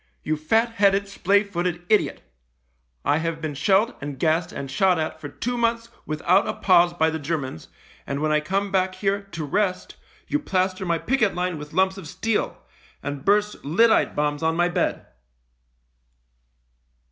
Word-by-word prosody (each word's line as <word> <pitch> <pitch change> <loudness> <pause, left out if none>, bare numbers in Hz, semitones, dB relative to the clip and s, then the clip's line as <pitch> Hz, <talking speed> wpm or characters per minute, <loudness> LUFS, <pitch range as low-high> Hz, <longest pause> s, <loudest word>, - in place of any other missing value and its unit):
" - - -44
You 155 - 0
fat 225 +10 +1
headed, 200 -2 +2
splay 200 +1 +2
footed 175 -3 -3
idiot. 215 +1 +1 0.8
I 145 - +3
have 165 0 -2
been 155 -2 -4
shelled 195 - +2
and 145 -1 -5
gassed 160 +4 +1
and 135 -1 -6
shot 180 +5 +3
at 160 0 -3
for 145 - -6
two 245 - -3
months 230 0 0 0.2
without 170 +5 +2
a - - -2
pause 175 -2 +4
by 160 -2 +1
the 160 - -3
Germans, 140 - -4 0.4
and 140 0 -2
when 155 +1 0
I 150 - +4
come 195 +6 -2
back 185 -1 +1
here 200 +1 0
to 170 -6 -7
rest 185 +5 -1 0.3
you 295 - 0
plaster 185 -7 -1
my 170 -1 +2
picket 225 +1 +1
line 180 -2 -2
with 150 +1 -9
lumps 190 +1 +2
of 170 - -9
steel, 225 +7 -1 0.5
and 145 -1 -5
burst 210 +1 +1
lyddite 220 +11 +3
bombs 145 0 0
on 160 0 +1
my 175 +1 +2
bed 175 -1 -1
180 Hz, 170 wpm, -24 LUFS, 155-200 Hz, 0.8 s, pause